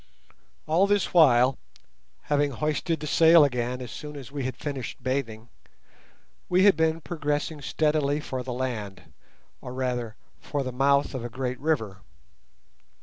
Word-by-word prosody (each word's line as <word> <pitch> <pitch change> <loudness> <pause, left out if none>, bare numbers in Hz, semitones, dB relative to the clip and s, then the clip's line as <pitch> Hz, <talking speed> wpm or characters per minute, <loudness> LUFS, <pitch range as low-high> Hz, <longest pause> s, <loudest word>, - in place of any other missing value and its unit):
All 170 +6 +3
this 205 -2 +1
while, 130 -6 +5 0.6
having 145 0 +1
hoisted 155 +4 -2
the - - -4
sail 165 +1 +6
again 125 -1 -2
as 125 -3 -7
soon 150 +7 -8
as 140 -2 -9
we 140 -3 -4
had 130 -2 -4
finished 135 -4 -6
bathing, 120 -3 -3 1.0
we 180 +1 +4
had 200 -3 +6
been 160 +1 +1
progressing 150 -2 -3
steadily 150 -1 0
for 130 -4 -5
the 125 0 -6
land, 110 -7 -5 0.5
or, 125 - -8
rather, 125 -4 -2 0.2
for 145 -2 -3
the 130 - -4
mouth 140 +3 +2
of 130 -3 -4
a 120 - -5
great 125 +1 -4
river. 110 -11 -1
140 Hz, 145 wpm, -26 LUFS, 125-155 Hz, 1.0 s, sail